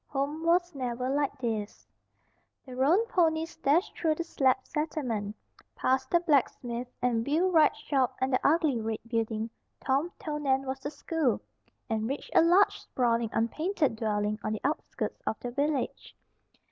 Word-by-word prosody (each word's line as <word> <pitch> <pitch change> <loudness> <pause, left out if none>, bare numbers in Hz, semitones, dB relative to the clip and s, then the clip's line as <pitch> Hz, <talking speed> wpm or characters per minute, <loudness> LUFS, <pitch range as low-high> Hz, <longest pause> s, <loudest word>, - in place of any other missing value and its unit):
"HOME 290 +3 -2
WAS 350 +1 +2
NEVER 250 -1 -2
LIKE 285 0 0
THIS" 220 -5 -3 0.8
The 255 -2 -9
roan 315 - +3
ponies 330 -6 +1
dashed 325 +5 +2
through 315 -2 +1
the 335 - -3
slab 265 -6 +2
settlement, 250 -10 -3 0.4
past 260 +1 +1
the 345 - +4
blacksmith 255 -6 0 0.2
and 235 -2 +2
wheelwright 320 +3 +3
shop 265 -4 0
and 260 0 0
the 255 - +4
ugly 295 -6 +3
red 220 0 -2
building 225 -1 -2 0.3
Tom 280 +6 0
told 300 -1 -4
Nan 270 -1 +1
was 265 0 -3
the 280 - -4
school, 295 -3 -1 0.5
and 220 0 -1
reached 275 - -5
a - - +7
large, 355 +5 +4
sprawling, 235 -2 0
unpainted 305 - 0
dwelling 210 -1 -1
on 215 - -1
the 215 - -4
outskirts 295 +3 -3
of 220 - -1
the 245 - -5
village. 285 +1 -2
270 Hz, 155 wpm, -29 LUFS, 235-315 Hz, 0.8 s, a